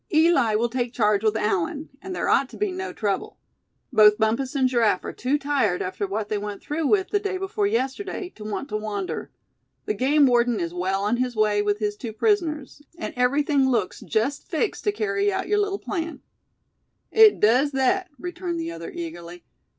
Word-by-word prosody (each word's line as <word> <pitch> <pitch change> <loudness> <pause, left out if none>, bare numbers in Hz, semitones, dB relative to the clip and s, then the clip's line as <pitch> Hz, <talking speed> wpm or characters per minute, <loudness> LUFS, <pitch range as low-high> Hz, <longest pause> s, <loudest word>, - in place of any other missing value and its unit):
Eli 315 -9 +4
will 230 +3 +2
take 240 0 -2
charge 210 -2 +2
with 220 0 +2
Allan; 210 - -1
and 375 -1 -6
there - - -2
ought 270 - +3
to - - -11
be 415 -2 0
no 375 +1 -4
trouble. 200 -3 -3 0.6
Both 210 -2 +7
Bumpus 230 +5 0
and 265 -2 +3
Giraffe 230 -7 +1
are - - -5
too 265 +4 0
tired 275 -10 0
after 185 +2 -3
what 205 +2 -3
they 210 -1 -1
went 205 -1 -5
through 300 0 -1
with 385 +1 +2
the 410 - +2
day 395 -2 -2
before 395 +2 -1
yesterday, 355 - -2
to 220 - -12
want 215 +6 -4
to 215 - -1
wander; 210 -2 -4 0.6
the 425 - 0
game 285 +1 +3
warden 240 -2 +3
is 170 0 -3
well 190 +2 -1
on 215 +4 +1
his 250 -1 -1
way 210 -1 +2
with 205 0 0
his 210 -1 -2
two 225 0 -7
prisoners; 305 - 0 0.2
and 335 - -5
everything 275 +2 +2
looks 225 -7 0
just 235 +6 -2
fixed 355 +6 -2
to 415 - +3
carry 410 -1 0
out 385 0 -2
your 415 +1 +2
little 400 -1 0
plan." 335 -5 -4 0.9
"It 440 -1 +6
does 250 +7 +4
thet," 290 +8 +1
returned 350 +2 -4
the 330 0 -3
other, - - -7
eagerly. 175 - -8
260 Hz, 195 wpm, -24 LUFS, 215-345 Hz, 0.9 s, Both